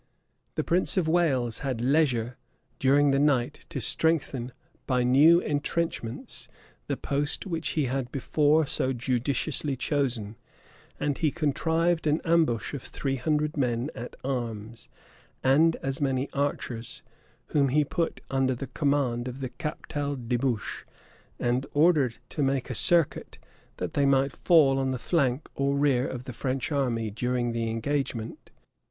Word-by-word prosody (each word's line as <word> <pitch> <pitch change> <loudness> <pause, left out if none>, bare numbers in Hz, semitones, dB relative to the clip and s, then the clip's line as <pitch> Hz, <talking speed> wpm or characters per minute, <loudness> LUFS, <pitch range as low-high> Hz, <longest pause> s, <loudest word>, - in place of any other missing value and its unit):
The - - 0
prince 180 +3 +1
of 175 -4 +2
Wales 135 -9 +1
had 130 -5 -3
leisure, 125 -3 +1 0.4
daring 140 +2 +4
the 135 - +2
night, 140 -4 +1
to - - -4
strengthen, 140 -6 +1 0.4
by 125 -2 +2
new 145 +7 +6
intrenchments, 150 -5 -3 0.4
the - - -1
post 145 +5 -2
which 165 -4 -3
he 150 - +3
had 130 -1 -2
before 150 +3 +2
so 130 -1 -1
judiciously 130 +4 -1
chosen; 125 -6 -1 0.6
and 145 -1 -1
he 155 - +3
contrived 160 +2 0
an 150 +2 +2
ambush 160 -10 +2
of 140 - -4
three 135 +1 -3
hundred 150 +3 0
men 125 +1 0
at 120 - -8
arms, 115 -4 -4 0.5
and 155 +5 +4
as 135 +1 -3
many 135 -1 0
archers, 125 -5 -3 0.5
whom 140 -2 +2
he 150 +3 +3
put 165 +3 -2
under 135 -1 +1
the 135 - -5
command 135 -4 0
of 125 +1 -6
the 130 -2 -4
Captal 145 0 -4
de 125 -1 -2
Buche, 120 -3 -2 0.5
and 125 +3 0
ordered 145 -6 +3
to 150 - -3
make 135 -2 0
a - - -1
circuit, 165 +6 +2 0.4
that - - -4
they 140 -1 +2
might 135 0 +2
fall 145 -6 +4
on 135 0 0
the 130 - -1
flank 135 -1 0
or 140 0 0
rear 140 -3 +2
of 125 -1 -5
the 130 -1 -7
French 130 +4 -2
army 120 -6 0
during 120 +2 -1
the 115 -1 -2
engagement. 115 -1 -3
135 Hz, 145 wpm, -27 LUFS, 125-150 Hz, 0.6 s, new